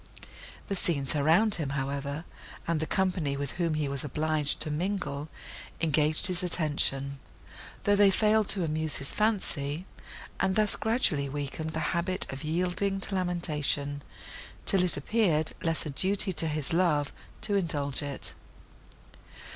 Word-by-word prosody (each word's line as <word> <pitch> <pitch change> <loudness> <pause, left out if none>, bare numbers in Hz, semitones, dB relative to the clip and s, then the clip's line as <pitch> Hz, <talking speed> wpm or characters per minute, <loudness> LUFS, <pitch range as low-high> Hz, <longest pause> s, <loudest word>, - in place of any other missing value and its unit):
The 200 - -2
scenes 155 -6 +1
around 165 +9 +4
him, 145 - -2
however, 140 +3 -3 0.4
and 165 -2 +1
the 160 - -2
company 180 -7 0
with 140 -1 -3
whom 170 -3 0
he 150 -2 0
was 140 -1 0
obliged 150 +1 0
to 155 - 0
mingle, 160 -3 -2 0.5
engaged 155 -1 +2
his 180 -1 +2
attention, 145 -5 0 0.6
though 205 - +4
they 200 -1 +6
failed 215 +1 +3
to 190 -3 +2
amuse 155 -1 0
his 140 - -2
fancy, 180 -7 -1 0.5
and 190 -1 +1
thus 215 -1 +6
gradually 185 - +1
weakened 145 +3 -4
the 160 - -1
habit 185 +2 +1
of 135 - -6
yielding 180 +5 0
to 195 - 0
lamentation, 150 -6 0 0.6
till 190 -2 +3
it 180 -4 +5
appeared 160 -2 +1
less 165 -1 -1
a 150 - -3
duty 190 +5 +1
to 165 0 +1
his 150 -1 -2
love 160 -5 +2 0.3
to 215 -1 +1
indulge 145 -8 0
it. 140 -1 -5
160 Hz, 145 wpm, -29 LUFS, 145-185 Hz, 0.6 s, they